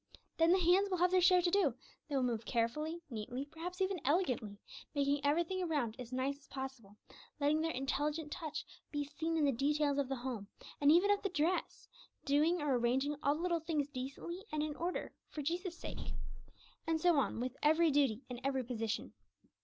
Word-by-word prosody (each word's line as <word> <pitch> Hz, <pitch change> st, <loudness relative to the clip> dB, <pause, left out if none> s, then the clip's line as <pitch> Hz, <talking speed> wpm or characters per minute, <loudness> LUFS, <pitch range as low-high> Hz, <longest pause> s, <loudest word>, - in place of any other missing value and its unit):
Then 330 Hz, +1 st, +5 dB
the 370 Hz, -, +6 dB
hands 370 Hz, +3 st, +4 dB
will 370 Hz, -, 0 dB
have 360 Hz, +1 st, +3 dB
their 370 Hz, 0 st, +5 dB
share 360 Hz, 0 st, +6 dB
to 350 Hz, -, +2 dB
do; 350 Hz, -, +3 dB, 0.3 s
they 290 Hz, -, -1 dB
will 265 Hz, -, +2 dB
move 235 Hz, -3 st, 0 dB
carefully, 300 Hz, +9 st, -1 dB
neatly, 240 Hz, +4 st, -4 dB
perhaps 340 Hz, +5 st, -7 dB
even 380 Hz, -3 st, 0 dB
elegantly, 255 Hz, -, +1 dB, 0.4 s
making 285 Hz, 0 st, +1 dB
every 295 Hz, +4 st, +3 dB
thing 370 Hz, +2 st, -3 dB
around 290 Hz, -10 st, 0 dB
as 245 Hz, -1 st, -7 dB
nice 265 Hz, +2 st, -1 dB
as 280 Hz, -, -22 dB
possible, 265 Hz, -7 st, -7 dB, 0.4 s
letting 300 Hz, +2 st, +3 dB
their 325 Hz, -, 0 dB
intelligent 295 Hz, +2 st, -1 dB
touch 310 Hz, -1 st, -4 dB, 0.2 s
be 290 Hz, -1 st, -1 dB
seen 320 Hz, +3 st, -2 dB
in 305 Hz, -, +3 dB
the 280 Hz, -, +4 dB
details 285 Hz, +2 st, +1 dB
of 275 Hz, -2 st, 0 dB
the 270 Hz, -, 0 dB
home, 240 Hz, -5 st, -5 dB, 0.3 s
and 285 Hz, +1 st, +7 dB
even 360 Hz, +5 st, +5 dB
of 410 Hz, -, +2 dB
the 400 Hz, -, -1 dB
dress, 345 Hz, +1 st, -1 dB, 0.4 s
doing 300 Hz, +4 st, +3 dB
or 270 Hz, -4 st, +2 dB
arranging 265 Hz, +5 st, +1 dB
all 285 Hz, +1 st, +2 dB
the 315 Hz, -, -5 dB
little 345 Hz, -2 st, +1 dB
things 305 Hz, -3 st, -1 dB
decently 285 Hz, +7 st, -6 dB
and 305 Hz, 0 st, 0 dB
in 305 Hz, -1 st, -3 dB
order 350 Hz, +3 st, -3 dB, 0.2 s
for 300 Hz, -, -5 dB
Jesus' 345 Hz, +3 st, -2 dB
sake. -, -, -6 dB, 0.7 s
And 325 Hz, -1 st, +1 dB
so 345 Hz, -1 st, +4 dB
on 260 Hz, -, 0 dB
with 250 Hz, +1 st, -3 dB
every 315 Hz, +2 st, +4 dB
duty 270 Hz, -4 st, +2 dB
in 245 Hz, -1 st, -7 dB
every 265 Hz, -1 st, 0 dB
position. 225 Hz, -2 st, -3 dB
295 Hz, 200 wpm, -35 LUFS, 265-335 Hz, 0.7 s, and